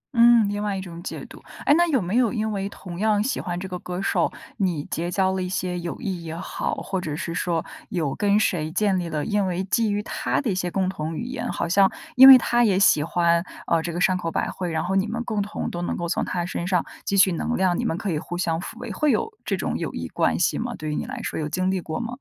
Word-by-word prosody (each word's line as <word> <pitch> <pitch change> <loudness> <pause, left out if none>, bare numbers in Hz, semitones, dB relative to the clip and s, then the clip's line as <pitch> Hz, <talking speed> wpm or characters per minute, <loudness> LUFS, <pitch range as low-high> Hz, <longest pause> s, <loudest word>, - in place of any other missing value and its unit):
嗯， 235 -2 +6
另 205 +1 -2
外 205 -2 -1
一 190 - -4
种 170 -2 -9
解 175 - -6
读。 - - -13 0.2
哎， - - +6
那 345 +1 +4
有 280 -5 +2
没 190 +2 -2
有 245 -3 +3
因 220 -2 -1
为 200 -1 -2
同 180 -3 -9
样 210 0 +2
喜 270 - -1
欢 175 0 -4
这 190 - -5
个 180 -1 -5
歌 180 0 -5
手， 195 - +1 0.3
你 180 -8 0
结 170 +2 -2
交 190 +1 +1
了 190 - -2
一 180 - -3
些 180 -1 -2
友 175 -1 -5
谊 190 -7 -4
也 160 -1 -6
好， - - -3
或 190 -2 -3
者 150 -4 -4
是 170 0 -4
说 170 -1 -1 0.2
有 155 -7 -1
跟 205 0 +2
谁 160 -7 0
建 195 +2 +1
立 170 -2 -3
了， 150 -2 -2
因 205 -2 +1
为 180 +1 -1
基 215 +3 +1
于 205 0 -1
她 - - -1
的 250 -7 -1
一 - - +1
些 180 -1 -1
共 190 +1 0
同 160 -3 -4
语 - - -3
言， 245 -1 -4
好 - - -2
像 195 +3 +4 0.2
因 265 +1 +10
为 265 -1 +12
她 240 0 +2
也 200 -5 +3
喜 170 -6 +5
欢， 170 +1 +2 0.2
呃， 165 - +2
这 170 - -4
个 170 - -4
山 185 0 +3
口 175 -2 -2
百 - - -1
惠， 180 -2 -4
然 160 0 -1
后 190 +2 -1
你 195 +2 +2
们 230 +2 -3
共 215 -4 -1
同 205 +1 -4
都 175 - -4
能 - - -2
够 170 - -3
从 - - 0
她 175 -1 -2
身 175 0 -4
上 180 -3 +1 0.2
汲 200 - +2
取 190 -1 +6
能 235 +8 -1
量， 185 -2 +2
你 - - -1
们 165 - -1
可 195 0 -2
以 155 - -1
互 175 +3 -6
相 165 -2 0
抚 210 - -8
慰， - - -6
会 300 - +1
有 445 - -1
这 - - -1
种 - - -2
友 - - -3
谊 - - -4
关 - - 0
系 - - +1
吗？ 240 +1 -3
对 155 -1 -4
于 - - -2
你 - - -2
来 265 +1 -6
说 - - -3
有 150 -1 -2
经 185 +4 0
历 190 -2 -1
过 160 - -4
吗？ 235 0 -4
185 Hz, 305 characters per minute, -24 LUFS, 175-210 Hz, 0.3 s, 为